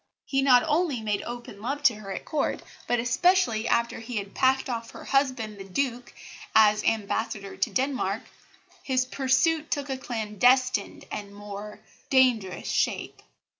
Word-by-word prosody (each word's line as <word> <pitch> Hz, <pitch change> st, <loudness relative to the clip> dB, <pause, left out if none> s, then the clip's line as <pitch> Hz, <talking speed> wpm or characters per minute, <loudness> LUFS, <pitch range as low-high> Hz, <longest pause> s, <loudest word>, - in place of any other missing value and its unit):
He 270 Hz, -1 st, +1 dB
not 255 Hz, -3 st, +6 dB
only 315 Hz, -4 st, +1 dB
made 210 Hz, -2 st, -1 dB
open 240 Hz, -4 st, -8 dB
love 280 Hz, +5 st, -3 dB
to 250 Hz, -, +6 dB
her 210 Hz, -2 st, -8 dB
at -, -, -5 dB
Court, 300 Hz, -3 st, -1 dB, 0.2 s
but, 245 Hz, -, +1 dB
especially 250 Hz, -, +2 dB
after 235 Hz, 0 st, +1 dB
he 230 Hz, +2 st, -7 dB
had 200 Hz, -1 st, -5 dB
packed 265 Hz, 0 st, +2 dB
off 230 Hz, -2 st, -4 dB
her -, -, -11 dB
husband, 255 Hz, -7 st, 0 dB
the -, -, -6 dB
Duke, 240 Hz, +5 st, -2 dB, 0.4 s
as 215 Hz, -1 st, +5 dB
Ambassador 210 Hz, -2 st, -1 dB
to 195 Hz, -, 0 dB
Denmark, 255 Hz, -6 st, -1 dB, 0.6 s
his 255 Hz, -1 st, +1 dB
pursuit 280 Hz, +5 st, +1 dB
took 285 Hz, -2 st, -2 dB
a 260 Hz, -, -3 dB
clandestine 240 Hz, 0 st, +1 dB
and 200 Hz, -1 st, -6 dB
more 205 Hz, +1 st, -8 dB, 0.3 s
dangerous 245 Hz, -8 st, +2 dB
shape. -, -, -1 dB
240 Hz, 150 wpm, -26 LUFS, 210-265 Hz, 0.6 s, not